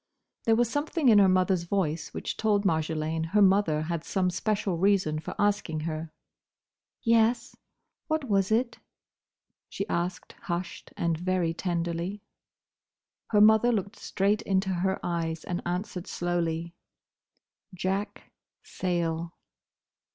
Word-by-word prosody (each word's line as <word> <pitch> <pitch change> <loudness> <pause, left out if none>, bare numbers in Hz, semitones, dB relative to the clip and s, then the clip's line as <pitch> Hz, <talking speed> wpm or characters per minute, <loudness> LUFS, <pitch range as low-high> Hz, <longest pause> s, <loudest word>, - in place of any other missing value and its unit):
There 225 - +4
was 240 +1 +3
something 290 +2 +1
in 210 -2 +7
her 195 -1 +6
mother's 185 -1 +2
voice 170 -4 -1
which - - -4
told 210 -2 +1
Marjolaine 160 -1 0
her 210 - +5
mother 190 -6 +3
had 165 0 -3
some 185 -1 0
special 200 -3 -1
reason 185 -5 +2
for 155 - -7
asking 200 -6 0
her. 155 0 -4 0.9
"Yes; 230 0 +2 0.5
what 315 -1 0
was 195 -2 +1
it?" 235 +2 +1 0.9
she 200 - -4
asked, 175 -2 -3
hushed, 175 0 -5
and 165 -2 0
very 180 -2 0
tenderly. 175 +3 -3 1.0
Her 210 -2 +3
mother 220 +3 +6
looked 200 -1 -2
straight 205 +2 0
into 190 -2 0
her 190 +1 0
eyes 165 -2 -2
and 175 0 -3
answered 180 0 -3
slowly, 170 -1 -2 1.0
"Jack—Sayle." 180 -3 -3
185 Hz, 120 wpm, -28 LUFS, 170-205 Hz, 1.0 s, in